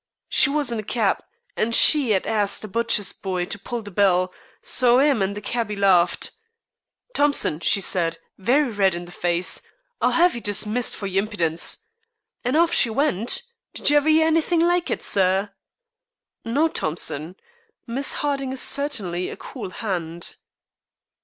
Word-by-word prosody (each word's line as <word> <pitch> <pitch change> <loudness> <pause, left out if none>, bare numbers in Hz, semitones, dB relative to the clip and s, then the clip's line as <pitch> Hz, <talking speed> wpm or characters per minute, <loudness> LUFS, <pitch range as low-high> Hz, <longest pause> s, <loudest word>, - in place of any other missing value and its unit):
She - - +5
was 285 -3 +1
in 230 - -2
a - - -5
keb, 210 -2 0 0.4
and 230 +1 +2
she 285 -7 +6
'ad 190 - -1
asked 210 -2 0
a - - -5
butcher's 225 -2 +1
boy 185 -3 -3
to 200 - -4
pull 235 +3 -5
the 205 - -10
bell, 185 -1 +2 0.3
so 250 -1 +3
'im 280 -5 +3
and 195 +1 -1
the - - -6
cabby 225 -1 -3
larfed. 190 -3 +2 0.8
'Thompson,' 285 - +1
she 200 - +2
said, 170 -3 0 0.2
very 255 +7 +1
red 195 -4 +2
in 175 0 -6
the 175 - -13
face, 175 0 0 0.4
'I'll - - +2
'ave 355 - +4
you 235 - -6
dismissed 210 +4 -1
for 200 - -6
your 195 0 +1
impidence.' 170 -6 -1 0.6
An' 250 +4 0
off 335 +1 +3
she 235 - +3
went. 245 - +1 0.3
Did - - +1
you 295 - +5
ever 290 +2 +2
'ear 315 0 +4
anythink 330 +1 +2
like 350 0 +1
it, - - -3
sir?" 195 +1 +1 0.9
"No, 280 +8 +1
Thompson, 160 - -4 0.5
Miss 265 +4 -1
Harding 275 -2 -2
is 265 - -5
certainly 205 -12 -2
a - - -8
cool 250 -8 -8
hand." 175 -5 -5
215 Hz, 165 wpm, -22 LUFS, 185-275 Hz, 0.9 s, she